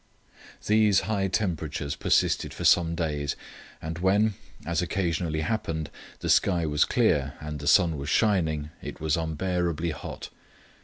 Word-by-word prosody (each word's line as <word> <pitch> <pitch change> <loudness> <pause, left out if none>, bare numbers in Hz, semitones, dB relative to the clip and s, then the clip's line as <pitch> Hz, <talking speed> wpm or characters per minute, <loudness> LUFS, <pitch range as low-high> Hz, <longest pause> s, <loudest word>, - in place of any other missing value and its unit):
These 105 -2 +4
high 100 -3 -1
temperatures 80 -8 -2
persisted - - +1
for - - -6
some 85 -1 +4
days, 75 -4 -2 0.5
and 80 +1 -5
when, 100 +4 +3 0.3
as 85 +1 0
occasionally 85 -4 -1
happened, 80 -4 -2 0.3
the - - -3
sky 90 -4 +3
was 75 -1 +2
clear 70 -2 +1
and 75 0 -6
the 75 - -6
sun 85 -5 +4
was 70 +1 -4
shining 80 -8 +1
it - - -7
was 80 -1 +1
unbearably 85 0 -1
hot. 75 - -7
85 Hz, 140 wpm, -27 LUFS, 75-95 Hz, 0.5 s, These